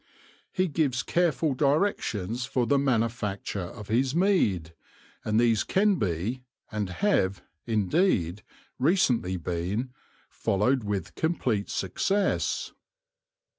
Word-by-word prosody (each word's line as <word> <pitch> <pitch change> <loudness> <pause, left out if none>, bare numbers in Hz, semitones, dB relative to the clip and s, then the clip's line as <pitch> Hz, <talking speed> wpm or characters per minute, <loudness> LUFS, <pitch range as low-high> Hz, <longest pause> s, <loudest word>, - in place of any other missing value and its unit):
He 185 0 +1
gives 140 -5 0
careful 160 -4 +1
directions 130 - 0
for 125 0 0
the 140 +3 +3
manufacture 115 -6 -1
of 105 -2 -10
his 130 +5 +1
mead; 105 - +2 0.5
and 110 +1 +1
these 115 -2 +3
can 200 0 +2
be, 100 +7 -2 0.3
and 105 -3 -2
have, 95 - +1 0.2
indeed, 105 - +1 0.4
recently 125 - +2
been, 90 - -3 0.4
followed 120 +6 0
with 100 -2 -3
complete 125 -11 -1
success. 195 - 0
120 Hz, 100 wpm, -27 LUFS, 100-150 Hz, 0.5 s, the